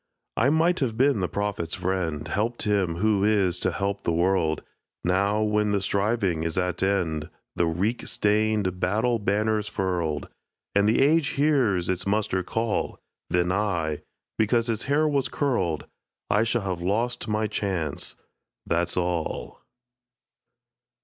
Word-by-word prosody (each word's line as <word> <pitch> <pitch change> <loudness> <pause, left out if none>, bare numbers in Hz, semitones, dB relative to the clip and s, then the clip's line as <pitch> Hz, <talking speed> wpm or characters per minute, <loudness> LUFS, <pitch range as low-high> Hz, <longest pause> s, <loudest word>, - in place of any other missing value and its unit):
I 125 +5 +3
might 165 +4 +3
have 115 -5 -1
been 135 -2 +3
the 90 - -1
prophet's 100 -5 -2
friend, 90 -5 -2
Helped 115 +4 -1
him 100 -5 +1
who 100 +2 +2
is 100 -4 +2
to - - +1
help 100 0 -2
the 85 - 0
world! 85 -2 +1 0.4
Now, 100 +4 +2
when 105 -1 +1
the 100 - +2
striving 100 -3 0
is 80 +1 -2
at 90 -1 -1
end, 90 -6 0 0.3
The 85 - +2
reek 95 +9 -1
stained 105 -3 +1
battle 110 +6 +1
banners 105 +1 0
furled, 90 -7 -2 0.5
And 100 +1 +4
the 115 - +3
age 155 +1 +4
hears 130 - +2
its 95 +1 -1
muster 100 -2 +1
call, 110 +4 -2 0.3
Then 90 0 +1
I, 90 -7 -1 0.4
because 115 +2 +3
his 115 -3 -2
hair 150 +3 +2
was 140 -3 +1
curled, 95 - 0 0.5
I 105 +2 +3
shall 115 -1 0
have 90 -3 -3
lost 115 +8 -1
my 110 0 0
chance 95 -8 -2 0.5
that's 85 +1 0
all. 85 -8 -2
100 Hz, 145 wpm, -26 LUFS, 90-110 Hz, 0.5 s, And